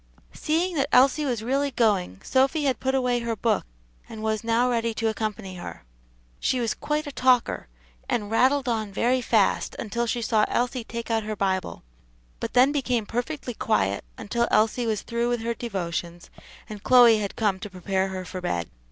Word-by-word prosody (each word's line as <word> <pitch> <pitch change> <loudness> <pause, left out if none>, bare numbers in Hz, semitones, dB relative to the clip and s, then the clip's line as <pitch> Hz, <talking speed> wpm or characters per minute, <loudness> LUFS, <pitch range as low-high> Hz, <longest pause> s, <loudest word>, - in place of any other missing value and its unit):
Seeing 340 +4 0
that 275 0 +1
Elsie 275 +4 +4
was 240 -5 -2
really 275 +4 0
going, 205 - 0
Sophy 270 +4 +2
had 265 -4 +1
put 265 0 0
away 250 -2 +1
her 235 -1 -2
book, 220 -1 0 0.4
and 220 -1 -8
was 220 0 -1
now 230 +2 +2
ready 230 -2 0
to 225 0 0
accompany 215 -3 -4
her. 175 - -8 0.6
She 255 - 0
was 230 -2 0
quite 300 +1 -2
a 290 - -5
talker, 255 -2 +2 0.4
and 210 -2 -1
rattled 260 +4 +3
on 220 -4 -1
very 245 +5 +1
fast 220 -4 +1
until 235 +2 -2
she 235 +1 -1
saw 220 -1 +2
Elsie 245 0 -1
take 230 +1 -6
out 225 -1 +2
her 215 0 -4
Bible; 190 - -2 0.6
but - - -4
then 255 +3 +5
became 250 -6 0
perfectly 245 +3 -4
quiet 100 - 0
until 235 +2 -1
Elsie 225 +2 +2
was 215 -2 -1
through 235 +1 -1
with 240 -1 -1
her 235 +1 -1
devotions, 175 -6 -5 0.4
and 210 -2 -8
Chloe 240 -2 +6
had 200 -2 -4
come 205 -4 0
to 210 +1 -7
prepare 190 +1 -1
her 185 -1 -5
for 185 0 -6
bed. 85 - -2
230 Hz, 185 wpm, -25 LUFS, 210-250 Hz, 0.6 s, Chloe